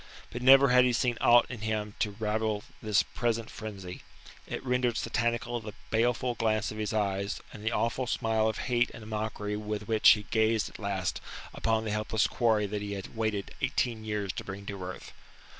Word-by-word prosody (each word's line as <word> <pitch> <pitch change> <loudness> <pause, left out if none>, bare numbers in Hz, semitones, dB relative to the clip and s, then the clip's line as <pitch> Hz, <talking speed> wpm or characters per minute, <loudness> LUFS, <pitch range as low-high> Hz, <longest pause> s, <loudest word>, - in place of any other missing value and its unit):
But 120 - -5
never 135 +1 +8
had 125 0 +6
he 125 -1 +2
seen 120 0 +1
aught 120 0 +6
in 120 -4 -7
him 105 -1 -2
to 105 -3 -1
rival 110 -1 -1 0.2
this 105 -2 +3
present 115 -1 -2
frenzy; 100 -4 -7 0.5
it - - -5
rendered 125 -2 +1
satanical 120 0 -1
the 105 -2 -9 0.2
baleful 120 +2 +1
glance 110 -2 0
of 110 - -7
his 105 -1 -1
eyes 100 -1 -1
and 105 - -10
the 110 - 0
awful 120 +2 0
smile 110 -2 +1
of 110 - -3
hate 120 -1 +2
and 115 - -10
mockery 105 -1 -3
with 105 0 -4
which 110 -1 +6
he 105 - +5
gazed 110 -1 +2
at - - -12
last 100 -3 -2 0.3
upon 110 -1 0
the 110 - -2
helpless 105 0 +1
quarry 110 -4 +2
that 105 +1 -3
he 100 0 -4
had 100 +3 -7
waited 110 -3 -2
eighteen 115 -3 0
years 105 -3 -2
to - - -5
bring 100 +1 -7
to 100 -2 -6
earth. 90 0 -7
110 Hz, 190 wpm, -29 LUFS, 105-115 Hz, 0.5 s, never